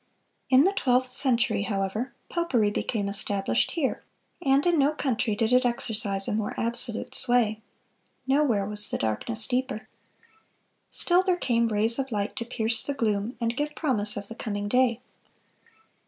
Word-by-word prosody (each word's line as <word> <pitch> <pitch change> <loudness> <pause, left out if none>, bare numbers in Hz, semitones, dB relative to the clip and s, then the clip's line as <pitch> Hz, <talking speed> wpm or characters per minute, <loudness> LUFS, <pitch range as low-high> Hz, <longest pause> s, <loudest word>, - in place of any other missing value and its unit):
In 260 +1 +5
the 385 - +3
twelfth 255 -7 0
century, 245 -6 +2
however, 200 +5 -3 0.2
popery 255 -12 0
became 205 -1 -3
established 200 - +1
here, 310 -6 -2 0.4
and 275 -1 +2
in 345 -3 +2
no 285 +2 +2
country 250 -6 -1
did 225 +2 0
it 250 +1 +4
exercise 215 -5 0
a - - -2
more 210 -1 -3
absolute 235 0 -3
sway. 230 -3 +1 0.6
Nowhere 265 -7 +1
was 210 0 +7
the - - -2
darkness 215 - -1
deeper. 255 -3 -3 1.0
Still 355 +1 +3
there 370 -1 0
came 235 -7 0
rays 225 +3 0
of 270 -1 -3
light 205 -1 -3
to 230 - -3
pierce 225 -1 0
the 285 - -3
gloom, 215 -1 -2
and 230 0 -2
give 295 +2 -3
promise 215 -9 +1
of 200 0 -6
the 225 - -8
coming 205 -3 -5
day. 250 +1 +1
235 Hz, 155 wpm, -26 LUFS, 210-265 Hz, 1.0 s, was